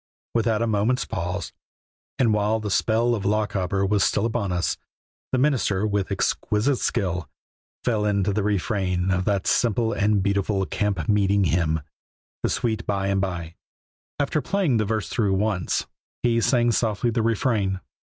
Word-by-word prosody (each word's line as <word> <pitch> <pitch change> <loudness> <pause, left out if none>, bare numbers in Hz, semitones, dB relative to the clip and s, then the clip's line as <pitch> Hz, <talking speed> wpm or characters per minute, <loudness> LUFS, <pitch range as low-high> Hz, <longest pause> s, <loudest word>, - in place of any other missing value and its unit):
Without 115 -1 +1
a - - +2
moment's 110 +3 +1
pause, 90 +3 -4 0.6
and 115 -4 +3
while 105 +1 +1
the 105 -2 -4
spell 115 +4 +2
of 105 -4 -2
"Lochaber" 100 -2 0
was 100 0 +2
still 100 - +1
upon 100 -4 -1
us, 90 -1 0 0.6
the 130 - +1
minister, 125 -8 +1
with 100 -3 -1
exquisite 115 +6 +1
skill, 90 -5 -1 0.5
fell 110 -4 +1
into 100 -1 +1
the 105 - 0
refrain 95 -2 0
of 90 0 0
that 100 -3 0
simple 115 0 +2
and 105 -2 +2
beautiful 100 0 0
camp 100 -7 -1
meeting 100 -1 +3
hymn, 80 -2 +1 0.6
"The - - 0
Sweet 110 -2 -1
By 100 -1 0
and 100 -1 +1
By." 85 -4 -3 0.6
After 145 +1 0
playing 185 - +1
the 110 - +1
verse 110 0 -1
through 100 -5 +1
once 100 -3 0 0.4
he 115 -1 +2
sang 120 -1 +3
softly 115 +1 0
the 115 - 0
refrain. 110 -4 +1
105 Hz, 155 wpm, -24 LUFS, 95-115 Hz, 0.6 s, and